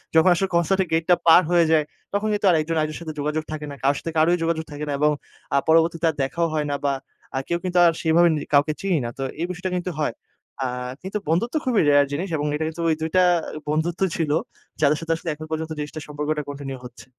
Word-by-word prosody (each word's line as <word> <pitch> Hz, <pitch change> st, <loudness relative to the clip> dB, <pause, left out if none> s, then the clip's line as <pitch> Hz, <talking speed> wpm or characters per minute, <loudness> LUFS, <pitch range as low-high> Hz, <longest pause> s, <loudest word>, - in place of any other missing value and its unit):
যখন 160 Hz, +3 st, +6 dB
আসলে 190 Hz, +2 st, 0 dB
কনসার্ট 170 Hz, +3 st, +2 dB
এর -, -, -10 dB
গেটটা 165 Hz, +2 st, +4 dB
পার 165 Hz, +2 st, +9 dB
হয়ে 170 Hz, -1 st, +5 dB
যায়, 155 Hz, -1 st, +4 dB, 0.3 s
তখন 205 Hz, +2 st, 0 dB
কিন্তু 205 Hz, 0 st, -1 dB
আর 175 Hz, -, +5 dB
১ 155 Hz, -, -1 dB
জন 165 Hz, -, 0 dB
আরেকজনের 155 Hz, 0 st, -2 dB
সাথে 160 Hz, -2 st, -5 dB
যোগাযোগ 150 Hz, +2 st, -1 dB
থাকে 155 Hz, -1 st, -4 dB
না। -, -, -7 dB
কারো 140 Hz, +1 st, +3 dB
সাথে 165 Hz, -, -5 dB
কারোই 165 Hz, +3 st, +4 dB
যোগাযোগ 165 Hz, -1 st, 0 dB
থাকে 150 Hz, +1 st, -5 dB
না, -, -, -1 dB
এবং 150 Hz, +1 st, +4 dB, 0.4 s
আ -, -, +5 dB
পরবর্তীতে 165 Hz, +1 st, +3 dB
আর -, -, -18 dB
দেখাও 165 Hz, +6 st, 0 dB
হয় 155 Hz, -1 st, 0 dB
না, -, -, 0 dB
বা 140 Hz, -, +2 dB, 0.4 s
আ -, -, 0 dB
কেউ 170 Hz, -, 0 dB
কিন্তু 180 Hz, -1 st, -1 dB
আর 170 Hz, -, +6 dB
সেইভাবে 165 Hz, +2 st, +4 dB
নি -, -, -1 dB
কাউকে 145 Hz, +2 st, +4 dB
চিনি 195 Hz, -3 st, +1 dB
না। -, -, -2 dB
তো -, -, -1 dB, 0.2 s
এই 170 Hz, -, 0 dB
বিষয়টা 180 Hz, +1 st, -4 dB
কিন্তু 180 Hz, +1 st, -3 dB
হয়। 150 Hz, -6 st, 0 dB, 0.5 s
আ -, -, 0 dB, 0.4 s
কিন্তু 190 Hz, +3 st, -3 dB
বন্ধুত্ব 215 Hz, -, 0 dB
খুবই 245 Hz, -5 st, +3 dB
রেয়ার 145 Hz, 0 st, +5 dB
জিনিস 170 Hz, +7 st, -3 dB
এবং 145 Hz, -, -2 dB
এটা 155 Hz, +1 st, -1 dB
কিন্তু 160 Hz, +1 st, -5 dB
ওই 160 Hz, -, +3 dB
২ 160 Hz, -, -1 dB
টা 185 Hz, -, +6 dB, 0.5 s
বন্ধুত্ব 160 Hz, +4 st, -1 dB
ছিল, 160 Hz, -3 st, -1 dB, 0.5 s
যাদের 150 Hz, 0 st, +4 dB
সাথে 165 Hz, 0 st, 0 dB
আসলে 165 Hz, +1 st, -5 dB
এখন 155 Hz, +1 st, -8 dB
পর্যন্ত 160 Hz, 0 st, -3 dB
জিনিসটা 150 Hz, +1 st, -5 dB
সম্পর্কটা 150 Hz, +1 st, -2 dB
কন্টিনিউ 140 Hz, -2 st, -6 dB
হচ্ছে। 125 Hz, -1 st, -12 dB
160 Hz, 240 wpm, -23 LUFS, 150-175 Hz, 0.5 s, পার